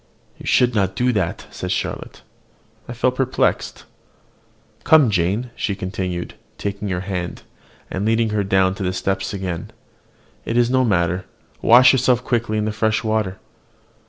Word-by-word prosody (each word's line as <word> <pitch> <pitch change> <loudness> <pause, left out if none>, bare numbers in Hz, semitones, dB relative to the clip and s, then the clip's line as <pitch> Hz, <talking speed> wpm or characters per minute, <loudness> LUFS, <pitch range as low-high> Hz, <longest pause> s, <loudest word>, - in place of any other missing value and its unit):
"You - - -9
should 125 -1 +3
not 95 -3 0
do 125 +3 +2
that," 95 -6 -2
said - - -5
Charlotte: - - -4 0.6
I 120 - -6
felt 130 +1 0
perplexed. 130 -1 0 1.0
"Come, 150 -8 +5
Jane," 100 +7 0
she 100 - -2
continued, 95 -2 -4 0.2
taking 100 0 -4
her 90 -1 -2
hand, 90 -2 -4 0.5
and 95 - -2
leading 115 +1 +2
her 105 -1 0
down 95 -1 +2
the 95 -2 -2
steps 95 +1 -2
again, 95 -4 -4 0.7
"it 115 - -2
is 120 0 +3
no 130 0 +3
matter: 90 -4 +1 0.4
wash 125 +3 +7
yourself 125 -1 +2
quickly 115 -3 -1
in 105 - 0
the 110 - -1
fresh 110 +1 0
water." 110 -4 -1
105 Hz, 150 wpm, -21 LUFS, 95-120 Hz, 1.0 s, wash